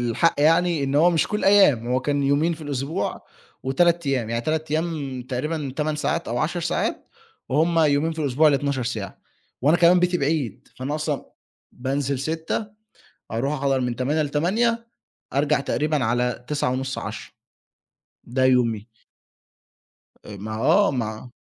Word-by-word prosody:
الحق 120 +8 +2
يعني، 165 0 +3
إن 135 - -2
هو 165 +5 +5
مش 165 -3 +2
كل 210 - -1
الأيام، 195 - +5
هو 125 +1 +1
كان 145 +2 0
يومين 145 +5 +2
في 165 - -8
الأسبوع 145 +4 -3 0.4
و3 170 +4 +2
أيام، 125 -5 0
يعني 115 0 0
3 155 +2 -2
أيام 155 -5 -2
تقريبًا 140 +3 -3
8 155 0 -1
ساعات 150 -5 -1
أو 120 - -1
10 170 +6 -1
ساعات، 170 - -2 0.4
وهم 165 +5 +2
يومين 155 +1 +3
في 160 - -10
الأسبوع 145 0 +2
اللي 145 -2 +5
12 140 -2 -1
ساعة. 115 -4 -4 0.4
وأنا 155 +5 +5
كمان 175 +1 +5
بيتي 180 0 +2
بعيد، 140 - -2
فأنا 130 +4 -3
أصلًا 150 -3 -2 0.5
بانزل 135 +1 -2
06:00 160 - -2 0.7
أروح 125 +6 -1
أحضر 135 -2 0
من 125 -1 -2
08:00 145 +6 0
ل20:00 215 +11 0 0.5
أرجع 145 +1 +2
تقريبًا 150 -1 0
على 125 +1 -1
21:30 135 -2 -1
22:00، - - -7 0.9
ده 130 +2 0
يومي. 120 -4 +2 1.4
أ 105 - -9
ما 105 +2 -6
آه، 200 - +4
مع 115 -2 -4
145 Hz, 150 wpm, -23 LUFS, 130-160 Hz, 1.4 s, هو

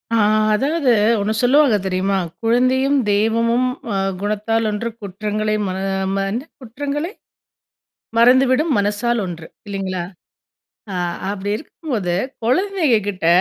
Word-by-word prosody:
ஆ - - +3 0.4
அதாவது, 275 +3 +1 0.3
ஒண்ணு 215 +2 0
சொல்லுவாங்க 265 -1 +4
தெரியுமா? 190 +1 0 0.2
"குழந்தையும் 255 +4 +2
தெய்வமும் 230 +4 +2 0.3
அ, - - -1 0.3
குணத்தால் 215 +2 0
ஒன்று. 210 +3 -2
குற்றங்களை 210 +2 -2
ம 185 - -2 0.4
மறந்து 200 +8 -2 0.2
குற்றங்களை, 285 - -4 1.1
மறந்துவிடும் 260 +5 +4
மனசால் 210 +3 0
ஒன்று", 165 -2 -7 0.2
இல்லங்களா? 190 -3 -3 0.9
அ - - -4 0.4
அப்படி 205 0 -4
இருக்கும்போது, 230 - -4 0.3
குழந்தைகங்க 320 - +2
கிட்ட, 185 -4 -2
225 Hz, 105 wpm, -20 LUFS, 205-260 Hz, 1.1 s, சொல்லுவாங்க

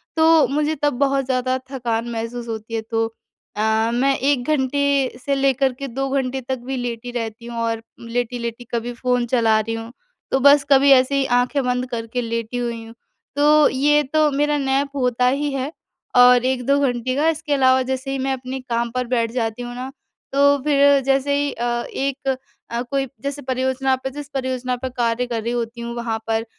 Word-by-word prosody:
तो 320 -1 +5
मुझे 300 +2 0
तब 290 -2 +2
बहुत 275 -1 +2
ज़्यादा 255 0 0
थकान 235 -2 -2
महसूस 230 +1 -4
होती 225 0 -6
है, 225 - -1
तो 225 0 -1 0.5
अ, 220 +1 +1
मैं 270 +3 +2
1 270 -2 +1
घंटे 280 -2 +1
से 280 -1 +1
लेकर 270 -1 +2
के 275 - -4
2 270 +2 -3
घंटे 265 -1 -1
तक 260 +1 -3
भी 265 0 -3
लेटी 245 0 -4
रहती 230 -1 -5
हूँ। 235 -1 -5
और 225 0 -2 0.2
लेटी-लेटी 235 0 -3
कभी 235 +1 -2
फ़ोन 250 0 0
चला 225 -2 +3
रही 225 +1 -2
हूँ, 225 +1 -7 0.4
तो 265 - +2
बस 285 +1 +6
कभी 275 +1 +6
ऐसे 265 +1 +5
ही 275 - +2
आँखें 265 +3 0
बंद 250 0 -1
करके 230 +1 -3
लेटी 230 +1 -3
हुई 235 -2 -3
हूँ। 225 - -12 0.4
तो 300 +1 +5
ये 295 +3 +3
तो 310 -1 +4
मेरा 295 +1 +1
नैप 275 0 0
होता 250 -2 +1
ही 285 +3 0
है 270 +2 -2 0.4
और 250 0 +7
1-2 260 +2 +1
घंटे 255 -2 0
का 300 +3 +2
इसके 315 -2 -2
अलावा 260 -1 +4
जैसे 265 +1 -3
ही 270 - -1
मैं 270 - 0
अपने 260 0 -5
काम 235 -1 -2
पर 250 -1 -1
बैठ 230 -2 0
जाती 235 -1 -2
हूँ 245 0 -6
ना, 255 +2 -6 0.4
तो 285 +1 +5
फिर 285 -1 +5
जैसे 275 +1 +1
ही 285 0 0
अ, 240 - -3 0.3
एक 275 0 -3 0.4
अ, 235 +1 -1
कोई 270 +2 -2
जैसे 280 +1 -4
परियोजना 260 0 0
पर 260 +1 -5
जिस 290 0 -7
परियोजना 255 -2 -2
पर 260 +1 -5
कार्य 235 +1 +1
कर 230 -2 -2
रही 235 - -2
होती 235 0 -3
हूँ 235 0 -5
वहाँ 235 -2 -2
पर 225 0 0
255 Hz, 195 wpm, -21 LUFS, 235-275 Hz, 0.5 s, और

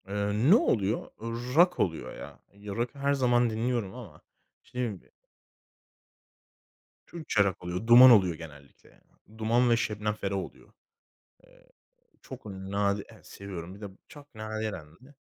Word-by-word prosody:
Iıı, 105 - 0
ne - - +9
oluyor? 110 - +1 0.2
Iıı, 120 +3 -5
rock 180 +2 +4
oluyor 80 -3 -2
ya. 70 -3 -11
Ya, 100 0 -8
rock'ı 120 +4 -3
her 140 +1 +1
zaman 120 -3 +2
dinliyorum 115 -2 -2
ama 100 -12 -11 0.4
işte 125 - -9
dediğim 120 -5 -1
gibi - - -25 2.0
Türkçe 155 -11 0
rock 95 -2 -3
oluyor, 90 +5 -4
Duman 125 +2 +10
oluyor 95 -7 +4
genellikle 75 -4 -14
ya. - - -25 0.4
Duman 115 +3 +2
ve 115 - +4
Şebnem 105 -1 -2
Ferah 100 -2 -4
oluyor. 95 - -9 0.7
Iıı, - - -24 0.5
çok - - -11
nadir 100 0 -2
Evet, - - -17
seviyorum. 95 -2 -8
Bir 100 - -15
de - - -6 0.2
çok 145 -3 -16
nadiren 110 -5 -5
hani 130 +3 -18
110 Hz, 150 wpm, -28 LUFS, 100-120 Hz, 2.0 s, Duman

